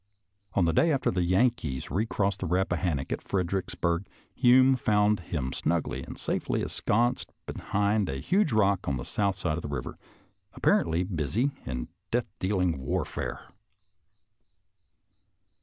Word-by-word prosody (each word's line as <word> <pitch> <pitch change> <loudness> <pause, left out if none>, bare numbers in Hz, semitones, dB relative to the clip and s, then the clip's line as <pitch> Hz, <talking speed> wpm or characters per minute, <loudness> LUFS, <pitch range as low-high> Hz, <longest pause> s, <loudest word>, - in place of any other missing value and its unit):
On 90 - +4
the 80 - +2
day 165 - +4
after 135 -3 +1
the 90 - 0
Yankees 90 - +1
recrossed 100 +2 0
the 95 - -2
Eappahannock 90 -5 0
at - - -2
Fredericksburg, 90 -1 -1 0.3
Hume 130 +2 +6
found 105 -3 +2
him 75 -6 -3
snugly 85 0 -1
and - - -8
safely - - -1
ensconced 120 +4 0
behind 100 0 0
a 65 - -2
huge 180 - +1
rock 100 -4 +2
on 70 - 0
the - - -6
south 100 -2 0
side 85 -4 -1
of - - -4
the - - -5
river, 70 -4 -5 0.6
appar - - +4
ently 85 +3 -1
busy 110 - 0 0.2
in 60 -1 -3 0.2
death 120 -4 -1
dealing 90 -6 +1
warfare. 65 - -3
95 Hz, 140 wpm, -28 LUFS, 80-105 Hz, 0.6 s, Hume